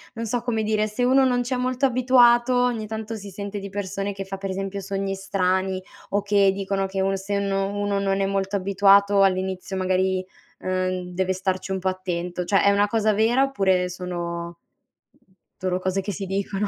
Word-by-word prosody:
non 230 0 -4
so 235 +2 -1
come 225 -3 -1
dire, 215 0 +1
se 215 +4 -2
uno 265 +2 +5
non 250 -1 +2
c'è 255 +2 -2
molto 255 +2 0
abituato 250 -1 +4
ogni 245 -3 0
tanto 220 +1 -5
si 205 -2 -8
sente 200 +1 -6
di 200 0 -7
persone 200 0 -3
che 195 0 -6
fa, 195 0 -6
per 195 0 -5
esempio, 195 +1 -4
sogni 195 0 -3
strani 190 0 0 0.3
o 205 - +1
che 200 -1 +3
dicono 195 0 -2
che 190 0 -4
uno 195 0 +1
se 200 +1 -2
no 195 -1 0
uno 205 -1 -1
non 195 0 0
è - - +2
molto 195 0 -1
abituato 200 +1 +4
all'inizio 190 0 -1
magari, 185 0 0 0.3
uhm, 185 -1 -2
deve 190 +1 0
starci 190 0 -2
un 190 - -1
pò 190 - -3
attento; 180 -1 -3
cioè, 195 +2 +2
è 200 - +5
una 205 +1 +3
cosa 215 0 +1
vera 230 +6 +3
oppure 190 -9 +1
sono 175 -1 -5 1.0
solo 185 -1 -1
cose 185 +1 -1
che 205 - -4
si 195 +1 -5
dicono? 195 +1 -2
195 Hz, 195 wpm, -24 LUFS, 190-210 Hz, 1.0 s, uno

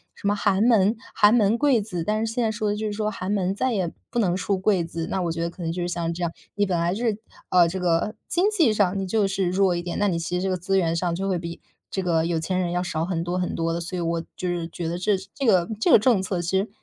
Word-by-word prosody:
什 - - -4
么 205 - +2
“寒 200 -1 +1
门 220 -2 +4 0.2
寒 205 +1 +6
门 220 -1 +3
贵 270 -4 +3
子”， 185 -5 -4
但 215 +4 0
是 225 - -3
现 245 - 0
在 220 - +1
说 215 -1 -2
的 - - -1
就 215 - -3
是 - - -2
说 210 0 -1
“寒 190 -1 -4
门” 195 -2 0
再 260 +5 0
也 185 -5 0 0.2
不 240 - -1
能 180 -6 +2
出 190 +2 -1
“贵 190 -2 +2
子”， 165 0 -5
那 190 - 0
我 170 -2 -1
觉 165 0 -3
得 170 - -1
可 175 +1 -9
能 165 - -1
就 175 +2 -3
是 175 - -1
像 170 -1 -2
这 175 - -7
样， 170 - 0 0.2
你 205 - +2
本 185 -3 0
来 170 +1 +1
就 230 +5 -3
是 220 -3 +1 0.3
呃， 175 -2 +5
这 185 - -4
个 180 +4 +1
经 355 +3 +1
济 330 - +3
上 200 -2 +2
你 195 - -2
就 210 +1 +2
是 190 -2 0
弱 185 0 +2
一 175 - -2
点， 175 0 -4
那 205 - +2
你 170 - 0
其 165 +1 -4
实 - - -2
这 190 - 0
个 185 - +1
资 190 +2 0
源 165 -3 +1
上 170 0 0
就 195 +3 -2
会 185 - +1
比 170 0 -7 0.3
这 190 - -1
个 165 -3 +1
有 165 -1 0
钱 180 +3 -2
人 175 -2 -1
要 180 0 0
少 160 -3 -2
很 170 -2 -2
多 175 +1 -2
很 180 -1 -1
多 165 0 -1
的， 170 - -2
所 180 +2 -5
以 - - -2
我 165 0 -1 0.2
就 185 - -3
是 175 -1 -2
觉 170 0 -5
得 170 +1 -2
这 195 +2 +1
是 190 +1 -11
这 275 - -3
个 185 -7 +4
这 - - +3
个 - - +8
政 220 -3 +3
策 185 -2 -2
其 175 +3 0
实， 200 - -2
185 Hz, 340 characters per minute, -24 LUFS, 170-205 Hz, 0.3 s, 个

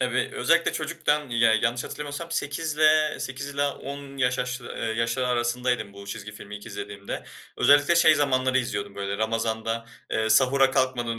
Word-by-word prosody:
Tabii. - - 0
Özellikle - - +2
çocukken, 150 -2 -1
ya 115 -1 +4
yanlış 115 +3 0
hatırlamıyorsam 150 +3 -6
8'le 155 0 +2
8 135 +2 -5
ile 145 0 -1
10 140 0 -5
yaş 125 -1 +1
yaş 125 0 -2
eee, 120 - -10 0.3
yaşları 115 +2 0
arasındaydım 120 -3 0
bu 100 0 -11
çizgi 105 +1 -7
filmi 105 0 -9
ilk 105 - -12
izlediğimde. 100 -1 -6 0.3
Özellikle 145 +4 +5
şey 160 -2 +6
zamanları 130 -3 +2
izliyordum, 100 -5 -3
böyle, 100 0 -3
Ramazan'da, 115 0 -1 0.2
eee, 110 0 0
sahura 130 +3 +4
kalkmadan 120 -3 0
125 Hz, 155 wpm, -25 LUFS, 110-140 Hz, 0.3 s, şey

